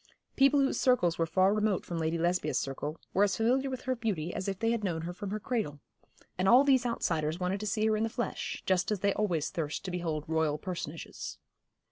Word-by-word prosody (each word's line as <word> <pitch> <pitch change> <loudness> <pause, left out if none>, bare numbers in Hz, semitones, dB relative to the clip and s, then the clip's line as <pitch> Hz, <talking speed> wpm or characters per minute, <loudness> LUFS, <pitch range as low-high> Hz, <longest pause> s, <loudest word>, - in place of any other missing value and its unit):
People 275 +1 +5
whose 270 - +1
circles 215 -11 +3
were 165 - +2
far 190 +3 +3
remote 210 -2 +1
from 170 -1 -4
Lady 160 +1 0
Lesbia's 175 +2 0
circle, 145 +3 -3
were 195 - +4
as 200 -2 +1
familiar 255 +4 +2
with 260 -1 -4
her 260 0 -1
beauty 195 -9 -2
as 190 - -4
if 195 -1 -2
they 225 +3 +1
had 230 -2 -1
known 165 -4 -1
her 175 +1 -4
from 200 +2 -6
her 210 +2 -2
cradle. 210 - -2 0.6
And 190 +1 +3
all 250 +3 +8
these 260 -3 +3
outsiders 160 -8 -1
wanted 185 +2 -1
to 215 - -4
see 215 +2 +1
her 220 0 +3
in 215 - -1
the 225 - +1
flesh, 240 +1 -4
just 185 -1 +2
as 205 -3 -1
they 200 -1 +2
always 175 -8 0
thirst 155 +2 -3
to 185 - -3
behold 165 -4 -2
Royal 160 -2 +1
personages. 165 -2 -6
190 Hz, 225 wpm, -30 LUFS, 165-225 Hz, 0.6 s, all